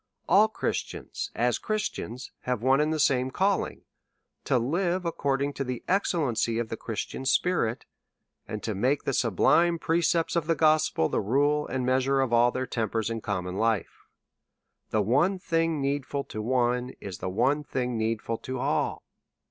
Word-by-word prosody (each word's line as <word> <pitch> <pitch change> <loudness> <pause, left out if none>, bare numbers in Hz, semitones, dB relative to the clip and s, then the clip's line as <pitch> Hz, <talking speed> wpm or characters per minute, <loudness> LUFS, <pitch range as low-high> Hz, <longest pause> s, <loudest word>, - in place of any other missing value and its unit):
All 200 +5 +6
Christians, 220 - -4
as - - +1
Christians, 210 - -4
have 125 -3 -1
one 135 +2 +4
and 155 +1 +1
the 160 - -1
same 130 -2 +2
calling, 195 +8 0 0.6
to 130 - +2
live 175 +8 0
according 140 -3 -1
to 135 - -3
the 125 -2 -5
excellency 145 - +1
of 115 -1 -2
the - - -3
Christian 115 +3 -5
spirit, 135 -4 +1 0.6
and 110 -1 -5
to 110 - -2
make 130 +9 +1
the 140 - -1
sublime 165 - +3
precepts 165 0 +1
of 165 -2 0
the 165 - +2
gospel 155 - +3
the - - 0
rule 145 +7 +1
and 130 -1 -2
measure 130 +2 +2
of 130 -3 +1
all 120 +1 +5
their 130 +1 -2
tempers 115 -1 -2
in 115 -1 -3
common 90 -3 -3
life. 110 -3 -1 0.8
The 110 -1 +1
one 150 - +2
thing 165 -3 0
needful 140 0 -1
to 110 - -6
one 125 +1 0
is 95 -3 -7
the - - -3
one 130 +10 +1
thing 125 -3 -2
needful 115 0 -2
to 130 0 -5
all. 135 +4 -1
130 Hz, 165 wpm, -27 LUFS, 115-155 Hz, 0.8 s, All